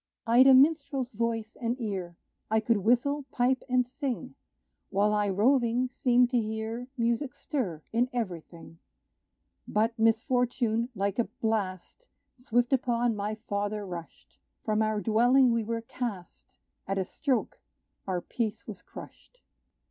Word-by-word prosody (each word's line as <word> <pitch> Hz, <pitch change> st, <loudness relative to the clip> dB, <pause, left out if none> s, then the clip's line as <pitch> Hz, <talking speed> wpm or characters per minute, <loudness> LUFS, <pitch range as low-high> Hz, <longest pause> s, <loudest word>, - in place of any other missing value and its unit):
I'd 245 Hz, +3 st, +6 dB
a 265 Hz, -, +9 dB
minstrel's 275 Hz, -2 st, +3 dB
voice 225 Hz, 0 st, -2 dB
and 240 Hz, +2 st, -1 dB
ear: 190 Hz, -7 st, -4 dB, 0.3 s
I 220 Hz, +1 st, +3 dB
could 225 Hz, 0 st, +2 dB
whistle, 250 Hz, +7 st, +1 dB
pipe 255 Hz, +1 st, +1 dB
and 250 Hz, -1 st, +2 dB
sing, 265 Hz, -1 st, -4 dB, 0.6 s
While 205 Hz, +2 st, +2 dB
I 210 Hz, -1 st, +1 dB
roving, 240 Hz, +4 st, +2 dB
seemed 250 Hz, -2 st, +3 dB
to 245 Hz, -, +3 dB
hear 220 Hz, +3 st, -4 dB
Music 235 Hz, +3 st, 0 dB
stir 190 Hz, -, -3 dB
in 240 Hz, +2 st, +2 dB
every 205 Hz, -10 st, -3 dB
thing. 165 Hz, 0 st, -15 dB, 0.9 s
But 220 Hz, +2 st, +1 dB
misfortune, 235 Hz, 0 st, +1 dB
like 200 Hz, +2 st, -1 dB
a 235 Hz, -, +3 dB
blast. 220 Hz, -, -3 dB, 0.3 s
Swift 245 Hz, 0 st, +1 dB
upon 240 Hz, -2 st, +1 dB
my 210 Hz, +1 st, -3 dB
father 205 Hz, +1 st, -2 dB
rushed; 70 Hz, -, -10 dB, 0.3 s
From 215 Hz, 0 st, +1 dB
our 215 Hz, -1 st, 0 dB
dwelling 245 Hz, +4 st, +4 dB
we 230 Hz, -1 st, +1 dB
were 230 Hz, +1 st, -3 dB
cast 230 Hz, -7 st, -7 dB, 0.3 s
At 195 Hz, +1 st, -1 dB
a 190 Hz, -, 0 dB
stroke 265 Hz, 0 st, -2 dB, 0.5 s
our 180 Hz, -2 st, -1 dB
peace 220 Hz, +1 st, -3 dB
was 205 Hz, -5 st, -8 dB
crushed. -, -, -13 dB
230 Hz, 140 wpm, -28 LUFS, 210-250 Hz, 0.9 s, a